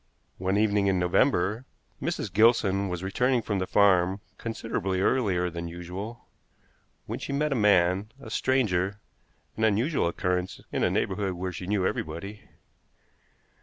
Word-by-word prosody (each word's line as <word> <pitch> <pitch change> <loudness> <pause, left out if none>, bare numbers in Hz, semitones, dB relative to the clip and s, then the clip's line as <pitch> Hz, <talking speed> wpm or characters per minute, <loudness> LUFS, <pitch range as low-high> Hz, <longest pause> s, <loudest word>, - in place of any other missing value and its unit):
One 95 +2 0
evening 105 -1 +2
in 95 -1 +2
November 95 +4 +2 0.4
Mrs. 95 - -3
Gilson 100 -3 +3
was 90 0 -4
returning 125 +5 +1
from 100 -3 -1
the 95 - -2
farm 95 -2 +3 0.2
considerably 110 -4 -2
earlier 95 -5 +1
than 85 0 -5
usual, 90 +7 -7 0.8
when - - -5
she - - -5
met 150 +2 0
a - - +1
man, 100 -1 +3
a 110 -5 -10
stranger, 105 -7 +1 0.6
an 110 - -1
unusual 110 - +2
occurrence 90 +1 -2
in - - -1
a - - +3
neighborhood 95 0 -1
where 90 +1 -4
she 90 +1 -7
knew 100 -2 +1
everybody. 95 +8 -4
100 Hz, 140 wpm, -27 LUFS, 90-110 Hz, 0.8 s, Gilson